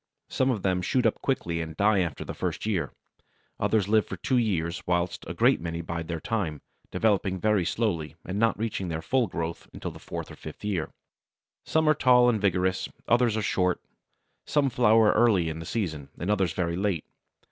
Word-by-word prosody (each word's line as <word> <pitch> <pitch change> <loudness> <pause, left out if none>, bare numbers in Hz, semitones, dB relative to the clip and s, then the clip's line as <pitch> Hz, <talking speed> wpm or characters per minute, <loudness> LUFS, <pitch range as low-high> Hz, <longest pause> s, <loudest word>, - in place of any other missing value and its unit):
Some 130 - +1
of 110 -7 -1
them 90 -1 +1
shoot 125 +7 +1
up 115 - +1
quickly 85 -11 -1
and 80 -1 -7
die 105 0 +4
after 85 -5 -2
the - - -5
first - - -3
year. 90 - -1 0.7
Others 105 -4 +2
live 110 0 +3
for 95 - -6
two 125 +8 +1
years, 90 -7 -1
whilst 85 0 0
a - - -5
great - - +3
many 85 0 -3
bide 85 0 -5
their 85 -1 -3
time, 85 - -2 0.3
developing 100 -3 +1
very 105 -1 +2
slowly, 85 -6 -1
and 95 +3 -3
not 115 -1 +2
reaching 105 -3 -2
their 80 -1 -3
full 130 +4 +2
growth 85 -2 -5
until - - -5
the - - -12
fourth - - -6
or - - -9
fifth 80 +6 -9
year. 95 -7 -1 0.8
Some 160 0 +2
are 155 - +6
tall 125 -3 +5
and 110 -4 0
vigorous, 95 -1 +1 0.2
others 120 -1 +3
are 110 - -1
short; 90 -3 +1 0.6
some 140 -3 +1
flower 110 -3 +5
early 105 -8 +3
in 80 0 -5
the 80 - -7
season, 80 -11 -3
and 90 +5 -1
others 95 -5 +1
very 85 -1 -1
late. 95 -5 -1
95 Hz, 195 wpm, -27 LUFS, 85-110 Hz, 0.8 s, are